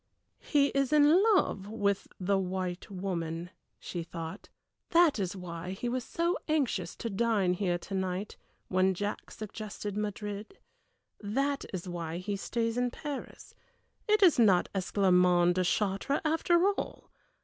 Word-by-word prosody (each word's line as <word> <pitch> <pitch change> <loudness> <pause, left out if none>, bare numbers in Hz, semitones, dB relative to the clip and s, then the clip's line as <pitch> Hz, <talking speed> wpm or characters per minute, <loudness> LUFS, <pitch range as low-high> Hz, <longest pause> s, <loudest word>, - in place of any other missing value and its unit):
"He 285 -2 +2
is 275 0 0
in 300 +4 +6
love 195 - 0
with 200 -2 -1
the 195 +1 +1
white 185 0 -3
woman," 175 -3 -4 0.3
she 175 - -5
thought; 165 -1 -7 0.4
"that 335 -7 +5
is 190 -1 -2
why 180 0 -6
he 215 +5 -4
was 250 +1 -1
so 340 +6 -1
anxious 255 - 0
to - - -5
dine 200 -3 +2
here 180 -2 0
to 185 - -9
night, 190 +1 -2 0.3
when 185 0 +2
Jack 205 +3 -4
suggested 210 -1 -6
Madrid; 210 - -4 0.6
that 275 +7 -1
is 185 -1 -5
why 170 -2 -4
he 200 +3 -3
stays 230 +3 -1
in 245 0 +1
Paris. 285 +2 -7 0.5
It 425 -1 +4
is 340 -9 +6
not 195 -6 +5
Esclarmonde 180 -2 +3
de 185 +1 +1
Chartres 200 +9 0
after 340 +3 +3
all! 405 - -5
200 Hz, 140 wpm, -30 LUFS, 180-250 Hz, 0.6 s, in